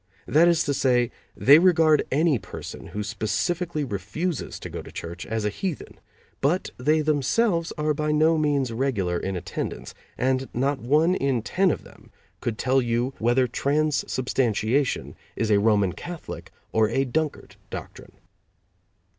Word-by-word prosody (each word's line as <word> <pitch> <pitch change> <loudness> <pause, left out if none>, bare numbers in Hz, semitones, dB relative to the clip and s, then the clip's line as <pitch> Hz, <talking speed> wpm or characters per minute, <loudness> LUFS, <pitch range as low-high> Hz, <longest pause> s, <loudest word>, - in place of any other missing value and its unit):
That 165 +3 +4
is 170 -2 +3
to 140 - 0
say, 125 -3 +2 0.3
they 145 +3 +7
regard 160 -4 +4
any 150 -2 +2
person - - -9
who 105 - -4
specifically 155 - -1
refuses 130 - -3
to - - -5
go - - -6
to - - -12
church 85 +2 -7
as 110 -1 -2
a - - +2
heathen, 180 - -5 0.4
but 160 +7 +1
they 155 +5 +2
themselves 165 - +1
are 150 0 +1
by 150 +1 -1
no 155 +2 +4
means 145 -5 +1
regular 105 -9 0
in 95 0 -3
attendance, 90 - -5 0.2
and 130 +1 0
not 135 +3 0
one 150 +9 +3
in 135 - 0
ten 190 +9 +2
of - - -2
them - - -17 0.3
could 115 -2 -3
tell 130 +1 +2
you 120 +2 -1
whether 120 +3 +3
transubstantiation 130 -3 0 0.2
is 110 -1 0
a 100 - +5
Roman 100 -4 +3
Catholic 170 - -8 0.2
or 110 -1 +3
a 135 +4 +1
Dunkard 155 +3 -3
doctrine. - - -9
135 Hz, 150 wpm, -25 LUFS, 115-155 Hz, 0.4 s, they